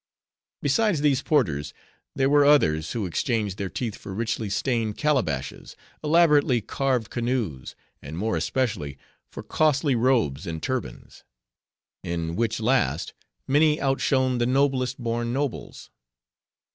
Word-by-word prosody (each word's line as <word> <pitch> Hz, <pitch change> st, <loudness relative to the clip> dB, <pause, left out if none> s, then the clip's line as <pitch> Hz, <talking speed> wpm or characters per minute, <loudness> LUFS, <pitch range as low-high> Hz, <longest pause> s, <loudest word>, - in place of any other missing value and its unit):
Besides 170 Hz, +3 st, +2 dB
these 145 Hz, -3 st, +2 dB
porters, 80 Hz, -, 0 dB, 0.4 s
there 135 Hz, -1 st, +2 dB
were 145 Hz, +1 st, +5 dB
others, 80 Hz, -, +3 dB
who 115 Hz, -4 st, -2 dB
exchanged 105 Hz, +2 st, -1 dB
their 100 Hz, -1 st, -2 dB
teeth 110 Hz, +5 st, -4 dB
for 95 Hz, -, -8 dB
richly 110 Hz, -1 st, -2 dB
stained 115 Hz, 0 st, -1 dB
calabashes, 105 Hz, -, -1 dB, 0.3 s
elaborately 150 Hz, -5 st, +4 dB
carved 125 Hz, 0 st, -1 dB
canoes, 115 Hz, -, -3 dB, 0.3 s
and 75 Hz, +4 st, -8 dB
more 110 Hz, +4 st, -1 dB
especially, 95 Hz, -, -2 dB, 0.3 s
for -, -, -8 dB
costly 150 Hz, -2 st, +1 dB
robes, 115 Hz, -, +1 dB
and 80 Hz, -1 st, -3 dB
turbans; 130 Hz, -1 st, -5 dB, 0.8 s
in 85 Hz, -1 st, -3 dB
which 115 Hz, +2 st, -1 dB
last, 110 Hz, -, 0 dB, 0.3 s
many 150 Hz, +2 st, +3 dB
outshone 130 Hz, -2 st, +1 dB
the 120 Hz, -, +1 dB
noblest 130 Hz, -1 st, +1 dB
born 120 Hz, -1 st, -2 dB
nobles. 140 Hz, -1 st, -4 dB
120 Hz, 120 wpm, -25 LUFS, 100-135 Hz, 0.8 s, were